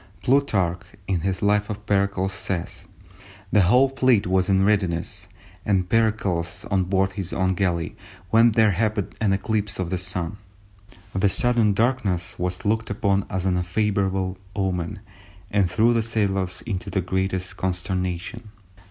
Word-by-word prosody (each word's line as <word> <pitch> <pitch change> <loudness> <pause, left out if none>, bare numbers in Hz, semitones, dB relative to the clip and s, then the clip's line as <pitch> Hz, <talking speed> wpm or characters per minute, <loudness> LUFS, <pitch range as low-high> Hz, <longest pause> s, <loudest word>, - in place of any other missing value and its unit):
Plutarch, 100 -10 +2 0.3
in 95 -3 0
his 95 +3 -2
Life 105 0 +2
of 105 0 -6
Pericles, 100 -1 +1
says:—"The 95 +2 -4
whole 125 +9 +5
fleet 130 -5 +3
was 95 0 +1
in 95 0 +3
readiness, 95 -5 0 0.4
and 95 -3 +1
Pericles 100 -6 0
on 95 -1 +2
board 95 +1 +1
his 95 -2 -5
own 95 0 +1
galley, 90 -3 -1 0.4
when 115 0 +5
there 110 -1 +4
happened 105 +1 -1
an 105 -3 +2
eclipse 105 +1 -1
of 90 -2 -3
the 95 - -1
Sun. 90 +1 -3 0.8
The 95 +1 +2
sudden 115 -1 +2
darkness 100 -6 0
was 90 +2 -3
looked 110 +2 0
upon 100 -1 0
as 95 -2 -2
an 90 -1 +2
unfavourable 95 0 0 0.2
omen, 95 0 -2 0.5
and 100 -3 +2
threw 110 +7 +3
the 115 - +2
sailors 100 -5 0
into 100 -6 -4
the 95 - 0
greatest 95 0 -2
consternation. 95 +4 -3
95 Hz, 145 wpm, -24 LUFS, 90-105 Hz, 0.8 s, whole